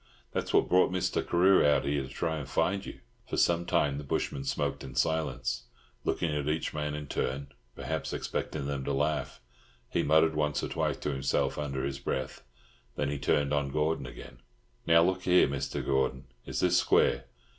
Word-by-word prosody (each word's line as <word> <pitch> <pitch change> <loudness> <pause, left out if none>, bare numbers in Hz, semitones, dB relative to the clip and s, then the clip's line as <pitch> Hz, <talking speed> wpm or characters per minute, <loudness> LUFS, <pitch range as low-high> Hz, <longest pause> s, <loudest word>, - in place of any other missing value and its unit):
That's - - -2
what - - +4
brought 90 0 +4
Mr. 95 -1 0
Carew 95 +3 +4
out 70 -2 +3
here, 70 0 0
to 65 - -7
try 80 +3 -2
and 70 -3 -6
find 95 +6 +1
you." - - -9 0.3
For - - -2
some 85 0 +2
time 70 -4 +1
the - - -6
bushman 70 0 -2
smoked - - -2
in 65 -1 -9
silence, 65 -4 0 0.4
looking 80 -3 0
at 75 0 -1
each 80 +1 -1
man 75 -1 -2
in 75 0 -5
turn, 70 0 -3 0.2
perhaps - - -3
expecting 70 -3 -3
them 70 -1 -3
to 70 - -1
laugh. 75 +2 -1 0.5
He - - +1
muttered 80 +1 +4
once 75 -1 0
or - - -2
twice - - -1
to 75 - -3
himself 70 +2 0
under 70 -3 -3
his 70 0 -3
breath. 65 -1 -3 0.5
Then 70 - -1
he 70 - -3
turned 70 +1 +1
on 70 -1 +1
Gordon 75 -1 0
again. 60 0 -11 0.5
"Now, 85 0 +6
look 95 +1 +1
here, 90 -1 +5
Mr. 70 0 -3
Gordon, 65 -1 0 0.2
is - - -2
this - - +4
square? - - +3
75 Hz, 190 wpm, -30 LUFS, 70-80 Hz, 0.5 s, Now